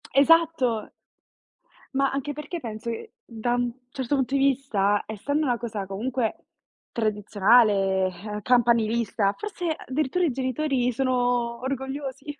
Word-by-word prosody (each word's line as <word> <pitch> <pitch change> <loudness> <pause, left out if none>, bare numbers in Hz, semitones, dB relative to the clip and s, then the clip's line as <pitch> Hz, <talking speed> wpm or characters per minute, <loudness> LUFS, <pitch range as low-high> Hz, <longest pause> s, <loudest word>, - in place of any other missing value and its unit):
Esatto. 280 -7 +3 1.1
Ma 275 0 +3
anche 280 +1 -3
perché 300 +4 -6
penso 225 -2 -6
che 235 - -6
da 235 - -2
un 245 -1 0 0.2
certo 265 0 -1
punto 265 0 -1
di 275 - +3
vista, 245 -7 +2
essendo 285 +8 -1
una 245 -3 0
cosa 215 -4 -4
comunque 225 +5 -3 0.5
tradizionale, 205 -2 +3
ehm, 210 +4 -6
campanilista, 230 -3 +2
forse 395 -5 -4
addirittura 305 +6 -1
i 305 - +1
genitori 260 0 0
sono 245 -1 0
orgogliosi. 270 +2 -4
245 Hz, 120 wpm, -25 LUFS, 220-275 Hz, 1.1 s, Esatto